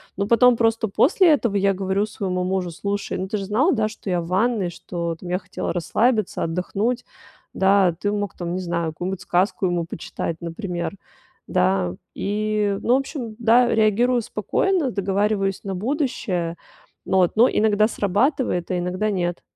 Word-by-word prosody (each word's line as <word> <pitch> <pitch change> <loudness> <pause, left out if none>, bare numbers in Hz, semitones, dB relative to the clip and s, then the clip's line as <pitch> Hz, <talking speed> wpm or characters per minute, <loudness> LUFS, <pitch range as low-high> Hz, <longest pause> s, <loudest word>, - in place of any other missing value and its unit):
но 200 +1 -1
потом 240 +1 +5
просто 225 -1 +2
после 340 - +4
этого 235 -8 0
я 200 0 +3
говорю 190 +1 0
своему 185 -4 -3
мужу, 185 -1 -1
слушай, 200 +4 -3
ну, 190 - -3
ты 210 - -2
же 195 - -4
знал, 240 - +2
да, 220 -4 +1
что 215 -2 -6
я 175 -1 +1
в 165 - -7
ванной, 195 +1 +1
что, 170 -1 -4
там, 175 - -11
я 180 +1 0
хотела 185 -2 -4
расслабиться, 215 +5 +1
отдохнуть. 200 +8 -1 0.5
Да, 190 -2 +4
ты 205 - 0
мог, 205 -2 -3
там, 175 -1 -3
не 185 - -2
знаю, 170 -2 -2
какую-нибудь 185 +3 -4
сказку 185 +2 0
ему 175 -2 0
почитать, 165 0 -5
например. 170 +1 -4 0.5
Да, 90 -1 +1 0.2
и 210 0 -1
ну, 240 - +3
в - - +4
общем, 265 -5 -6
да, 235 +2 +5
реагирую 230 +3 +3
спокойно, 270 - 0
договариваюсь 200 0 0
на 195 - -4
будущее. 195 - -2 0.5
Но, 190 - +1
вот, 180 -2 +3
но 235 +3 +6
иногда 215 0 +3
срабатывает, 210 - 0
а 185 - 0
иногда 180 +4 -1
нет. 175 -3 -2
200 Hz, 170 wpm, -22 LUFS, 180-220 Hz, 0.5 s, но